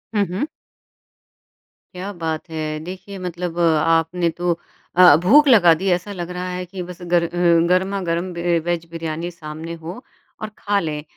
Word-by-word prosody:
हुँ, 205 -1 +3
हुँ। 210 +12 -2 1.5
क्या 190 +3 -5
बात 160 +1 -3
है। 155 -1 -3
देखिए, 190 +3 -8
मतलब 175 -1 -4
आपने 165 +1 +2
तो 175 -1 0 0.4
अ, 180 -4 +8
भूख 285 +12 +6
लगा 185 -10 +7
दी। 190 +4 -3
ऐसा 180 +3 -1
लग 175 -2 -5
रहा 180 0 -4
है 180 0 -4
कि 180 +1 -7
बस 175 0 -9
गर 175 -1 +2
अ, 170 - -2 0.4
गरमा-गरम 185 -1 0
बे 170 0 0
अ, 165 - -1
वेज 175 -1 -1
बिरयानी 165 +1 -4
सामने 160 0 -8
हो 170 +7 -8 0.4
और 215 - -4
खा 205 -1 0
लें। 150 -4 -4
175 Hz, 165 wpm, -21 LUFS, 165-185 Hz, 1.5 s, अ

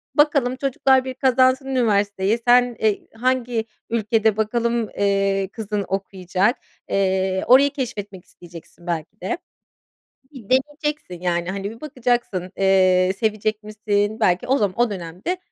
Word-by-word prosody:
Bakalım, 280 -4 +3
çocuklar 270 -1 +2
bir 260 - -4
kazansın 260 0 +3
üniversiteyi. 210 -4 +1
Sen, 245 0 +5
eee, 215 -2 0
hangi 245 -1 -1 0.2
ülkede, 220 -1 +1
bakalım, 235 +1 0
eee, 195 -1 +1
kızın 210 -3 -3
okuyacak. 190 +3 -1 0.3
Eee, 190 -1 0
orayı 275 +3 +6
keşfetmek 205 -8 -6
isteyeceksin 175 0 -14
belki 170 +5 -4
de. 355 - -2 0.9
Bir 260 -6 -11
deneyeceksin. 290 - -1
Yani, 175 0 -1
hani, 200 +2 -4
bir 230 - -13
bakacaksın, 240 -10 -2
eee, 185 -1 +4
sevecek 215 -1 -1
misin? 210 0 -1
Belki 180 -2 +1
o 270 +2 +3
zaman 205 +1 -1
o 240 - +3
dönemde, 185 - -4
215 Hz, 130 wpm, -22 LUFS, 195-250 Hz, 0.9 s, orayı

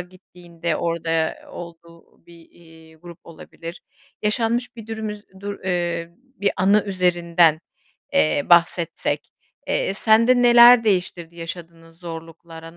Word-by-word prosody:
gittiğinde 175 -1 -7
orada, 170 -1 -3
eee, 160 -1 -1
olduğu 170 -1 -13
bir, 170 -1 -17
eee, 160 -1 -19
grup 170 +1 -13
olabilir. 165 +1 -11 0.4
Yaşanmış 235 +3 -1
bir 225 - -10
dürüm 220 -1 -5
üz 210 0 -9 0.2
dur, 200 0 -6
eee, 170 -2 -2
bir 255 -5 -3
anı 200 +3 +3
üzerinden, 175 -4 +2 0.5
eee, 80 - +1
bahsetsek, 170 -1 +2 0.4
eee, - - -1
sende 230 +3 +4
neler 240 0 +8
değiştirdi 180 -4 -1
yaşadığınız 165 -1 -10
zorluklara, 165 -1 -10
175 Hz, 120 wpm, -21 LUFS, 165-210 Hz, 0.5 s, neler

